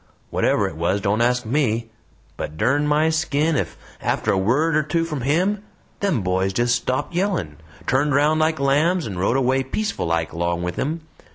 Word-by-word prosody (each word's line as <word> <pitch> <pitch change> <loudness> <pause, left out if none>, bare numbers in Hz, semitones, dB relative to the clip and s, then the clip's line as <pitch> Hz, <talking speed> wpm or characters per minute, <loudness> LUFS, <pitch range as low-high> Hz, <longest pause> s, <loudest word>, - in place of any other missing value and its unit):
Whatever - - +2
it - - -7
was 90 +4 +1
don't 100 +3 0
ask 125 0 +2
ME 115 -3 0 0.4
but, 75 - -6
dern 145 - +2
my 155 +2 +3
skin, 155 0 +1
ef - - -2 0.2
after - - 0
a - - +2
word 145 +11 +2
or 155 - +4
two 165 +3 0
from 150 -5 -4
HIM 180 +10 +1 0.4
them 185 - 0
boys 95 +1 0
just 120 +3 +2
stopped 130 +5 -2
yellin', 175 - -1 0.3
turned 140 +2 +2
round 150 +2 +3
like 155 0 +1
lambs, 150 +6 +2
and 95 -5 -5
rode 100 +7 +2
away, 130 0 +2
peaceful 205 - -2
like, 85 0 -1
along 85 +1 -1
with 90 0 -3
him. 160 +4 -2
135 Hz, 185 wpm, -22 LUFS, 105-155 Hz, 0.4 s, or